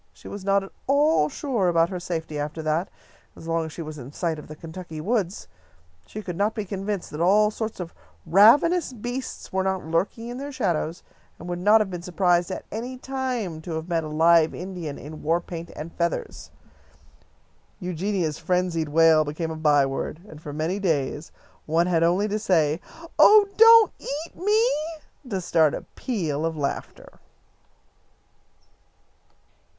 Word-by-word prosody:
She - - -14
was 200 -1 -7
not 195 0 +2
at 195 - -10 0.2
all 280 - +3
sure 235 - -1
about 170 -1 +3
her 180 - -3
safety 160 -4 -4
after 150 +2 -4
that, 155 +5 0 0.5
as 165 - -11
long 165 0 0
as - - -9
she 165 - -6
was 155 -1 -8
in 130 +1 -9
sight 160 0 -2
of - - -11
the 155 - -9
Kentucky 160 0 -8
woods. 200 +1 -1 0.6
She 215 - -7
could 180 -3 -5
not 205 +4 0
be 215 -3 -3
convinced 195 0 -4
that 150 - -5
all 210 +4 +4
sorts 220 -1 -5
of 175 -2 -6 0.3
ravenous 270 - +5
beasts 245 0 -6
were 190 - +1
not 190 -2 -1
lurking 195 +8 -1
in 245 +1 -6
their 285 +1 -5
shadows, 175 - -2 0.3
and - - -10
would 175 0 -3
not 210 +4 +5
have 200 -3 -2
been 175 -1 -5
surprised 175 0 +1
at 185 - -5
any 245 +4 -5
time 250 -11 -3
to 165 0 -6
have 160 +1 -4
met 165 -2 0
a - - -5
live 160 +1 +4
Indian 175 -5 -6
in 155 +2 -9
war 165 +3 +1
paint 170 -1 -8
and 160 +2 -7
feathers. 170 0 -3 1.3
Eugenia's 180 -3 -2
frenzied 170 -2 0
wail 160 0 +5
became 155 +2 -4
a - - -4
byword, 145 -1 +1
and 155 -4 -12
for 150 - -7
many 160 +6 -2
days 155 -4 -1 0.4
one 165 +2 +2
had 175 -2 +1
only 180 +5 +2
to 215 +1 -1
say, 165 -6 +2 0.4
"Oh, 420 -1 +8
don't 455 0 +8
eat 300 +4 -6
me!" 425 +5 +2 0.6
to 195 -4 -1
start 160 -4 +2
a - - -6
peal 165 - -2
of 165 -1 -2
laughter. 140 -2 -5
175 Hz, 170 wpm, -24 LUFS, 160-210 Hz, 1.3 s, Oh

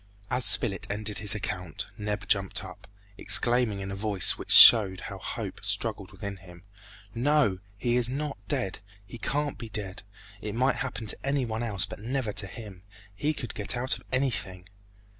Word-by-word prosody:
As 125 - +3
Spilett 95 -4 +4
ended 105 0 -2
his 105 +1 +1
account, 90 -5 -5
Neb 105 -1 -4
jumped 95 -2 0
up, - - -12 0.3
exclaiming 120 -4 +4
in 95 0 -6
a - - -5
voice 100 -2 0
which - - -10
showed 95 -5 +8
how - - -8
hope - - -6
struggled - - -1
within 100 -1 -7
him, 90 -2 -15 0.5
"No! 125 -5 +1 0.2
he 120 +4 0
is 120 -1 +1
not 140 -1 -4
dead! 95 - -2 0.3
he 115 +4 -11
can't 145 +3 -2
be 115 - -7
dead! 105 0 -6 0.4
It 105 0 -5
might 130 +3 +1
happen 125 -3 -5
to 110 - +1
any 140 -1 0
one 110 0 -4
else, 105 -5 +2
but - - -10
never 120 0 -3
to 100 -1 +1
him! 100 -3 -10 0.3
He 145 +10 -1
could 125 -6 -7
get 105 +4 -1
out 130 -1 0
of 115 - -12
anything!" 100 -9 -2
110 Hz, 180 wpm, -27 LUFS, 100-125 Hz, 0.5 s, showed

